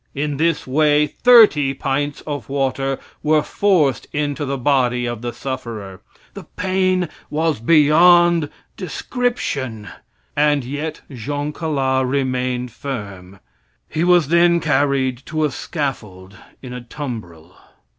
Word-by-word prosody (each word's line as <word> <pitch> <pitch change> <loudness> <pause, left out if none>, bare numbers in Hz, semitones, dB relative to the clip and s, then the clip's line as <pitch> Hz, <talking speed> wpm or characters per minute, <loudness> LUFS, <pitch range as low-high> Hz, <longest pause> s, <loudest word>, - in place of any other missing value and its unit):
In 145 0 -2
this 165 +1 0
way 150 +2 +3
thirty 150 - +5
pints 140 +1 -2
of 145 -2 -6
water 135 0 -1 0.2
were 155 0 +2
forced 170 -10 +1
into 145 -1 -2
the 135 0 -2
body 125 -2 +1
of 120 -2 -4
the 120 0 -3
sufferer. 115 -7 -6 0.3
The - - -10
pain 185 -1 +1 0.2
was 155 -3 0
beyond 165 +4 +5 0.3
description, 135 - -3 0.5
and 145 -1 +2
yet 145 +5 -5
Jean 145 +4 -4
Calas 135 -5 0
remained 125 -2 -1
firm. 100 -8 -7 0.5
He 160 - -2
was 175 -4 +4
then 170 +1 +4
carried 140 -4 0
to 155 -1 0
a 150 - -1
scaffold 105 - -5 0.3
in 125 -1 -7
a 125 - -6
tumbril. 110 - -8
140 Hz, 120 wpm, -20 LUFS, 125-155 Hz, 0.5 s, thirty